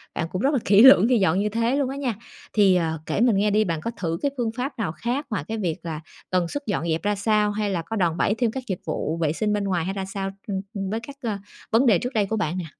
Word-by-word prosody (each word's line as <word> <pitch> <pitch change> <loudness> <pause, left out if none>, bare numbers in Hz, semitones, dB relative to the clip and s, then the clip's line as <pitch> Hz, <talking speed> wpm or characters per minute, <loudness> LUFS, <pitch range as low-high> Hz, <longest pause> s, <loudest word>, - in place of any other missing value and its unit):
bạn 165 - -1
cũng 185 - -2
rất 280 +4 +2
là 265 - +2
kỹ 205 +4 +6
lưỡng 260 -6 +9
khi 245 - +4
dọn 190 -1 +2
như 210 +1 0
thế 230 +4 0
luôn 280 -2 0
á 270 - -4
nha. 255 -6 -2 0.4
Thì, 200 -3 +5
ờ, 160 -3 0
kể - - -1
mình 235 -5 +4
nghe 210 +1 +2
đi, 215 +1 +3
bạn 165 -5 -2
có 230 - -3
thử 165 -2 -2
cái 285 - 0
phương 230 -2 0
pháp 255 0 -4
nào 195 -7 -1
khác 240 - -3
ngoài 200 - -2
cái 225 - -3
việc 175 -7 -1
là 160 -2 -5 0.3
tần 180 -2 +1
suất 285 - -5
dọn 200 -5 -1
dẹp 160 +1 0
ra 205 0 +1
sao, 210 0 +2
hay 205 0 -1
là 175 -4 -1
có 225 +7 -5
đòn 175 -4 +1
bẩy 205 - +2
thêm 235 -2 +1
các 265 0 -5
dịch 190 -3 -3
vụ 160 +1 -2
vệ 160 -2 0
sinh 210 +3 0
bên 205 -1 0
ngoài, 180 -4 0
hay 190 - -2
ra 195 -1 -4
sao, 195 0 -4 0.2
ừm, 195 -2 -2
ừm, 195 -3 -3
với 220 - -2
các, 275 +5 -10
a, 215 -4 -2 0.3
vấn 230 +5 +4
đề 210 -8 +5
trước 250 +2 -4
đây 210 -3 +2
của 220 +3 -2
bạn 180 -3 -1
nè? 175 - -3
205 Hz, 305 wpm, -24 LUFS, 180-230 Hz, 0.4 s, lưỡng